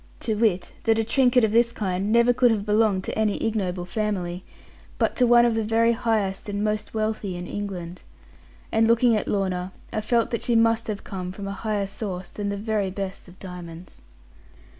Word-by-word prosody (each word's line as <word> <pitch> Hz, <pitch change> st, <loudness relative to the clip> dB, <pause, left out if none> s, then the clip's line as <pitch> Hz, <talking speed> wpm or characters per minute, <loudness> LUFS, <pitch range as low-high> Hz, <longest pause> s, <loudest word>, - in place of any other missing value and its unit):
To 220 Hz, -, 0 dB
wit, 210 Hz, -4 st, 0 dB
that 225 Hz, 0 st, +3 dB
a 225 Hz, -, +2 dB
trinket 250 Hz, +1 st, +3 dB
of 220 Hz, -, +3 dB
this 235 Hz, +1 st, +4 dB
kind 195 Hz, -1 st, -2 dB
never 235 Hz, +1 st, +5 dB
could 245 Hz, 0 st, +4 dB
have 210 Hz, -3 st, 0 dB
belonged 210 Hz, -3 st, +2 dB
to -, -, -4 dB
any 215 Hz, -2 st, +1 dB
ignoble 190 Hz, -5 st, -1 dB
family, 185 Hz, -3 st, -3 dB, 0.5 s
but -, -, +1 dB
to 250 Hz, -, +4 dB
one 240 Hz, 0 st, +6 dB
of 235 Hz, -, +2 dB
the 225 Hz, 0 st, 0 dB
very 225 Hz, +2 st, +3 dB
highest 220 Hz, -5 st, -1 dB
and 205 Hz, 0 st, -2 dB
most 215 Hz, +1 st, -2 dB
wealthy 215 Hz, -4 st, -2 dB
in 175 Hz, -, -6 dB
England. 180 Hz, -3 st, -6 dB, 0.7 s
And 225 Hz, 0 st, +3 dB
looking 235 Hz, 0 st, +4 dB
at 210 Hz, -, -2 dB
Lorna, 185 Hz, -2 st, -1 dB, 0.2 s
I 215 Hz, -, -1 dB
felt 230 Hz, +2 st, +1 dB
that 235 Hz, -, -1 dB
she 240 Hz, -, 0 dB
must 230 Hz, 0 st, +3 dB
have 215 Hz, -2 st, -4 dB
come 185 Hz, -2 st, -5 dB
from 195 Hz, +1 st, -7 dB
a -, -, -3 dB
higher 205 Hz, 0 st, -2 dB
source 190 Hz, -3 st, -6 dB
than 205 Hz, -1 st, -3 dB
the 200 Hz, -, -2 dB
very 210 Hz, -2 st, -1 dB
best 195 Hz, 0 st, -6 dB
of 180 Hz, +1 st, -15 dB
diamonds. 175 Hz, -2 st, -10 dB
210 Hz, 200 wpm, -24 LUFS, 190-225 Hz, 0.7 s, one